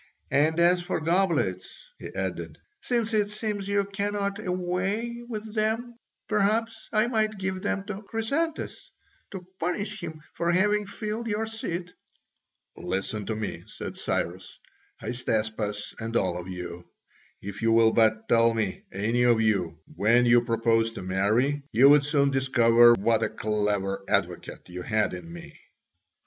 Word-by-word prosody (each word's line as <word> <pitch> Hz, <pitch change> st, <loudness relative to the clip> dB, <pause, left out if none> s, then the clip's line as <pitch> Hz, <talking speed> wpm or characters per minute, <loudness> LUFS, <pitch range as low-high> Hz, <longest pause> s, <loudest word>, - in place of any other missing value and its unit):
And 155 Hz, +3 st, +3 dB
as 175 Hz, +1 st, +4 dB
for 175 Hz, 0 st, -2 dB
goblets," 175 Hz, -, 0 dB
he -, -, -7 dB
added, -, -, -4 dB, 0.2 s
"since 230 Hz, -2 st, 0 dB
it 210 Hz, -1 st, +2 dB
seems 210 Hz, -2 st, -3 dB
you 200 Hz, 0 st, +1 dB
cannot 200 Hz, 0 st, -2 dB
away 190 Hz, +6 st, -2 dB
with 215 Hz, -2 st, -6 dB
them, 225 Hz, +2 st, 0 dB, 0.3 s
perhaps 220 Hz, +2 st, 0 dB
I 215 Hz, 0 st, +3 dB
might 215 Hz, -3 st, 0 dB
give 190 Hz, -1 st, -3 dB
them 195 Hz, -, -1 dB
to 200 Hz, 0 st, -6 dB
Chrysantas 275 Hz, +10 st, -3 dB, 0.4 s
to 185 Hz, -2 st, -8 dB
punish 200 Hz, +5 st, -2 dB
him 155 Hz, -1 st, -7 dB
for 170 Hz, 0 st, 0 dB
having 205 Hz, +3 st, +2 dB
filled 215 Hz, +3 st, -4 dB
your 220 Hz, 0 st, -1 dB
seat." 180 Hz, -5 st, -4 dB, 0.8 s
"Listen 100 Hz, +2 st, -3 dB
to 110 Hz, -, -1 dB
me," 110 Hz, -1 st, -4 dB
said -, -, -7 dB
Cyrus, -, -, -3 dB, 0.4 s
"Hystaspas, 110 Hz, -4 st, -2 dB
and 115 Hz, +1 st, -1 dB
all 90 Hz, -2 st, 0 dB
of 90 Hz, -, -8 dB
you. 90 Hz, -1 st, -7 dB, 0.5 s
If 100 Hz, 0 st, -7 dB
you 115 Hz, 0 st, +3 dB
will 115 Hz, 0 st, +5 dB
but 110 Hz, 0 st, +3 dB
tell 115 Hz, 0 st, +4 dB
me, 110 Hz, -4 st, -2 dB
any 110 Hz, +5 st, 0 dB
of 120 Hz, -2 st, +4 dB
you, 95 Hz, -7 st, +1 dB, 0.2 s
when 120 Hz, +4 st, +4 dB
you 120 Hz, 0 st, +6 dB
propose 115 Hz, -1 st, +2 dB
to 110 Hz, -, -7 dB
marry, 110 Hz, +10 st, +1 dB
you 130 Hz, +5 st, +6 dB
would 145 Hz, 0 st, +6 dB
soon 140 Hz, -1 st, +2 dB
discover 120 Hz, -3 st, +5 dB
what 115 Hz, +1 st, +2 dB
a -, -, +1 dB
clever 105 Hz, -2 st, -1 dB
advocate -, -, -1 dB
you 90 Hz, 0 st, -7 dB
had 105 Hz, 0 st, 0 dB
in 85 Hz, -2 st, -8 dB
me." 85 Hz, 0 st, -11 dB
145 Hz, 150 wpm, -27 LUFS, -, 0.8 s, you